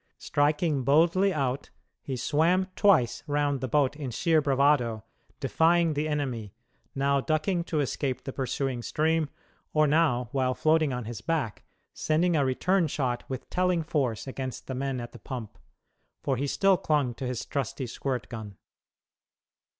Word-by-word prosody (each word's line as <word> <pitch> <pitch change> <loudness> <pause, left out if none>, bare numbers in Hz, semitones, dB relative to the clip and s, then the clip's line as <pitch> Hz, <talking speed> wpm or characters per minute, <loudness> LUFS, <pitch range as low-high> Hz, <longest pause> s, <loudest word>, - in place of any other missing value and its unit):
Striking 150 0 +1
boldly 170 +8 +4
out, 140 -4 -2 0.3
he 135 - -4
swam 165 +8 +2
twice 185 - +3
round 145 -2 0
the 130 - -1
boat 140 +2 +2
in 145 -3 -5
sheer 160 +6 +2
bravado, 135 -6 +2 0.4
defying 165 0 +3
the 150 +1 -1
enemy; 130 -9 -3 0.4
now 140 0 +2
ducking 160 +4 0
to 155 -4 0
escape 135 -1 -2
the 135 - -6
pursuing 130 -1 -2
stream, 155 +3 0 0.4
or 155 0 +4
now, 145 -6 +2
while 130 -2 0
floating 155 0 +2
on 125 -2 -3
his 115 -1 -6
back, 155 -10 -2 0.3
sending 165 +3 +1
a 145 - +3
return 170 +7 +2
shot 130 -4 -2
with 130 -1 -5
telling 180 -2 +1
force 140 -9 -1
against 130 -1 -5
the 130 - -5
men 135 0 -2
at 120 0 -7
the - - -12
pump 120 -5 -7 0.7
for 135 - +1
he 140 +3 -2
still 195 +6 +3
clung 145 -7 +1
to 130 +2 -5
his 125 -2 -3
trusty 135 -1 -3
squirt 125 +1 -3
gun. 110 -5 -8
140 Hz, 155 wpm, -28 LUFS, 130-155 Hz, 0.7 s, boldly